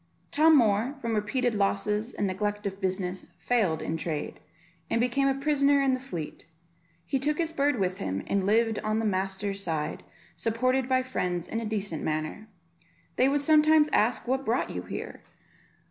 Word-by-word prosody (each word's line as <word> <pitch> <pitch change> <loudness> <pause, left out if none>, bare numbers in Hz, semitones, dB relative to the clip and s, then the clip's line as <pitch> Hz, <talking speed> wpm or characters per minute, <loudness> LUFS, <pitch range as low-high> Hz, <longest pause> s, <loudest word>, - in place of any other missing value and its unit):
Tom 315 +1 +6
Moor, 225 +3 +2
from 230 -3 -2
repeated 240 +3 0
losses 210 +2 0
and 205 - -2
neglect 205 +2 -2
of 195 0 -4
business, 185 -1 -2
failed 200 -10 0
in 165 - -2
trade, 155 -2 -4 0.5
and 230 - +1
became 250 +3 +2
a 270 - +2
prisoner 280 0 +3
in 270 -1 +3
the 255 - -1
Fleet; 170 - -7 0.6
he 270 - -1
took 295 +3 0
his 330 -1 -1
bird 290 -3 +1
with 185 -2 -1
him, 95 +1 -3
and 200 -1 0
lived 225 +1 +2
on 215 0 -1
the 225 - 0
master's 195 0 -1
side, 160 -3 -2 0.3
supported 255 +3 0
by 255 0 +3
friends, 180 -9 -2
in 225 - -3
a 230 - -4
decent 200 -7 -3
manner. 155 +7 -3 0.7
They 260 +2 +4
would 285 +1 +1
sometimes 310 0 +5
ask 225 0 +1
what 265 +2 0
brought 240 0 0
you - - -4
here? - - -7
220 Hz, 175 wpm, -28 LUFS, 195-265 Hz, 0.7 s, Tom